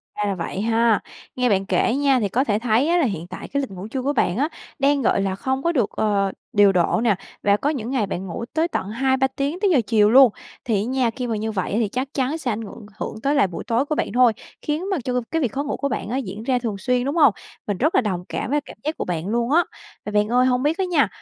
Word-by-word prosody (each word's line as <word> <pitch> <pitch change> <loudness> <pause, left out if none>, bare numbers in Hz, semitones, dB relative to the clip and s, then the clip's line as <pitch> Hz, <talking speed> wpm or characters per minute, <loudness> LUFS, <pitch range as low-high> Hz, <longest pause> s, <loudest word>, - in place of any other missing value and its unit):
Ra 210 - -1
là 195 - -1
vậy 185 +2 -4
ha. 225 -1 +3 0.4
Nghe 250 -1 +1
bạn 195 -1 +2
kể 190 +5 +1
nha, 275 -2 +3
thì 205 -4 -1
có 255 +7 +1
thể 210 -5 0
thấy 235 +5 +2
á 345 - +3
là 335 - +3
hiện 175 -6 -3
tại 185 - -8
cái 280 0 -1
lịch 265 - -5
ngủ 190 +2 -7
trưa 260 +3 -3
của 280 +3 0
bạn 205 -7 +1
á, 295 +4 +1 0.3
đang, 280 0 +3
gọi 220 - +2
là, 195 -1 -1
không 265 +6 -2
có 340 - +2
được, 245 -10 +1
ờ, 200 -2 +1 0.2
điều 205 -2 +6
độ 180 +4 +2
nè 215 -5 +3 0.3
và 200 0 +4
có 285 - 0
những 255 -5 -3
ngày 250 -6 +1
bạn 185 +1 -4
ngủ 205 +7 -5
tới 320 +2 +2
tận 200 - -3
2-3 265 +3 +1
tiếng 280 +6 -3
tới 410 - +2
giờ 265 -7 +4
chiều 210 -2 +4
luôn, 255 -1 +7 0.3
thì 230 - +1
á - - -4
nha, 255 -1 +1
khi 250 +1 -4
mà 225 - -1
như 220 +1 -2
vậy 190 -4 -2
ấy 215 - +1
thì 225 - +1
chắc 255 +5 -2
chắn 275 +4 0
sẽ 255 -6 -2
ảnh 215 - -3
ngượng 215 0 -9
hưởng 220 - -5
tới 280 +2 +2
lại 275 -8 +4
buổi 175 - -7
tối 235 +4 0
của 305 - -2
bạn - - -1
thôi, 245 -2 +5 0.3
khiến 315 +6 -2
mà 380 - +1
cho 250 - -2
cô 250 - +2
cái 325 - 0
việc 245 -7 0
khó 280 - -2
ngủ 290 - -3
của 280 - -1
bạn 210 - -3
á 255 - -1
diễn 215 -4 -5
ra 250 0 +1
thường 220 -5 -3
xuyên, 250 +5 0
đúng 285 +4 -1
hông? 290 -10 +6 0.3
Mình 205 -3 -1
rất 310 +6 +1
là - - +5
đồng 185 -6 -2
cảm - - -3
với 295 0 +2
cảm - - -13
giác 310 +2 -2
của - - -3
bạn 175 0 -3
luôn 235 +3 0
á. 340 +3 +5 0.4
Mà 210 - -4
bạn 210 0 +2
ơi, 250 +2 +3
hông 250 0 +1
biết 310 +5 +1
á 380 - 0
nha, 320 - +3
245 Hz, 295 wpm, -22 LUFS, 210-275 Hz, 0.4 s, luôn